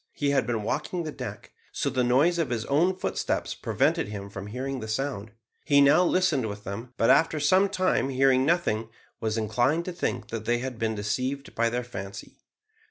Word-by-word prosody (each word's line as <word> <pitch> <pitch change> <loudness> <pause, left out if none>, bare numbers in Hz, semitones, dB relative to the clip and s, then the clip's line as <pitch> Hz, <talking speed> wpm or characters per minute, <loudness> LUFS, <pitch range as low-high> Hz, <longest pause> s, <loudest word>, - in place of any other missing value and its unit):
He 145 -1 0
had 135 -2 +1
been 115 -3 -1
walking 155 - -2
the 155 - -4
deck, - - -8 0.2
so - - -2
the 130 -1 +1
noise 145 +8 +3
of 165 - 0
his 115 -2 -2
own 170 +7 +2
footsteps 185 - -2
prevented - - 0
him 100 -1 -7
from 100 0 -7
hearing 130 +4 -4
the 110 - -6
sound. 110 -2 -3 0.3
He 140 -2 +4
now 145 +5 +6
listened 170 -9 +2
with 105 0 -7
them, 110 +6 -6
but 115 - +4
after 160 -1 +3
some 185 +7 +4
time, 185 -7 +1
hearing 130 0 +3
nothing, 135 -9 +1 0.3
was 110 -1 -1
inclined 120 +10 +1
to 185 - -3
think 145 -9 -3
that 115 -1 -5
they 120 +1 +2
had 125 -1 -5
been 110 -1 0
deceived 130 +7 -3
by 115 0 +1
their 125 +1 -2
fancy. 100 -4 -8
130 Hz, 195 wpm, -27 LUFS, 110-150 Hz, 0.3 s, now